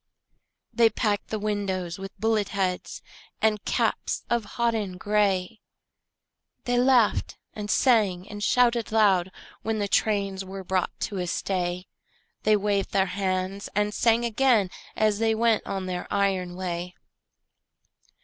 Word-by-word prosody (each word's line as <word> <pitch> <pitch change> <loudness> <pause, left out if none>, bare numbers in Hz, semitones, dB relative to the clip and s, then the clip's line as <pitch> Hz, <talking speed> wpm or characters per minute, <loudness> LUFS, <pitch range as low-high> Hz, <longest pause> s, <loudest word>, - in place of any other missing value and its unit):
They 230 -1 +5
packed 210 -3 -1
the 220 - -3
windows 195 -4 -2
with 195 +1 -8
bullet 220 -1 +1
heads 185 -3 -2 0.4
And 215 -1 +1
caps - - 0
of 235 -2 +1
hodden 220 -6 0
gray; 205 0 0 1.0
They 245 0 +1
laughed 250 -4 +3 0.2
and 210 -1 -6
sang 210 -9 +2
and 205 0 -7
shouted 235 -1 +2
loud 195 -5 +3 0.3
When 220 0 -1
the 205 -1 -1
trains 200 -2 0
were 190 0 -7
brought 185 0 -1
to 205 - -3
a 180 - -2
stay; 180 0 -2 0.6
They 215 0 +4
waved 200 -1 -1
their 190 -1 +3
hands 190 0 -2
and 210 0 +1
sang 235 +1 +2
again 230 -5 +2 0.2
As 215 -1 +2
they 225 0 +2
went 230 -1 +2
on 195 -1 -3
their 180 -1 -4
iron 190 -3 0
way. 180 -1 -4
205 Hz, 135 wpm, -26 LUFS, 185-220 Hz, 1.0 s, They